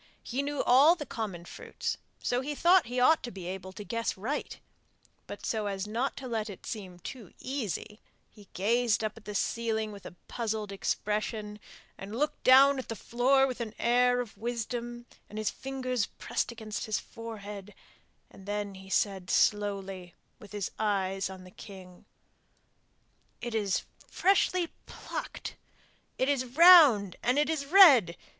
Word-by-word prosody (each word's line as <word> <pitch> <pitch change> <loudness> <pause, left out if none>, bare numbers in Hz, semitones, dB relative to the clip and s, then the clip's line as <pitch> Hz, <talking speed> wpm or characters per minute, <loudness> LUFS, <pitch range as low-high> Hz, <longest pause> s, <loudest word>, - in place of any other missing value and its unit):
He 255 +3 -2
knew 285 0 -2
all 280 +7 +6
the 300 -4 -7
common 200 -8 -5
fruits, - - -5 0.3
so 245 +1 0
he 290 +2 -4
thought 350 -1 +4
he 250 +1 -2
ought 315 +6 +5
to 245 - -6
be 190 -5 -9
able 190 +1 -6
to 210 - -8
guess 230 0 -3
right; 250 +10 -4 0.7
but - - -8
so 215 -2 -1
as 195 -1 -3
not 235 +6 -2
to 270 - -6
let 225 -2 -2
it 195 - -10
seem 195 -7 -7
too 210 +2 -10
easy, 220 - -5 0.3
he 205 -3 -18
gazed 230 +3 +1
up 215 - -2
at 225 - -15
the 210 - -6
ceiling 220 0 -1
with 200 -2 -10
a - - -12
puzzled 220 -3 -3
expression, 210 +1 -3 0.4
and 200 +3 -7
looked 300 +3 -2
down 270 +1 +7
at 260 - -6
the 225 - -3
floor 255 +5 +2
with 255 -2 -4
an 220 -2 -5
air 245 +1 +3
or - - -3
wisdom 240 +2 -4 0.2
and 210 - -9
his 215 -1 -1
fingers 255 -4 -3
pressed - - -3
against 220 -2 -6
his 215 - 0
forehead, 210 -3 -9 0.6
and 195 - -15
then 205 -1 -3
he 190 0 -12
said, 190 -3 0
slowly, 195 -3 0 0.2
with 210 -4 -14
his 205 -3 -4
eyes 195 -3 0
on 190 -1 -10
the 185 - -14
king, 185 -3 -13 1.3
'It 240 -1 -5
is 205 -4 0 0.2
freshly 370 -2 +2 0.2
plucked! - - -7 0.6
It 260 - +1
is 280 -3 +1
round 265 - +7
and 250 +3 +1
it 295 +2 +2
is 285 -3 -3
red! 275 - +7
220 Hz, 165 wpm, -29 LUFS, 200-255 Hz, 1.3 s, down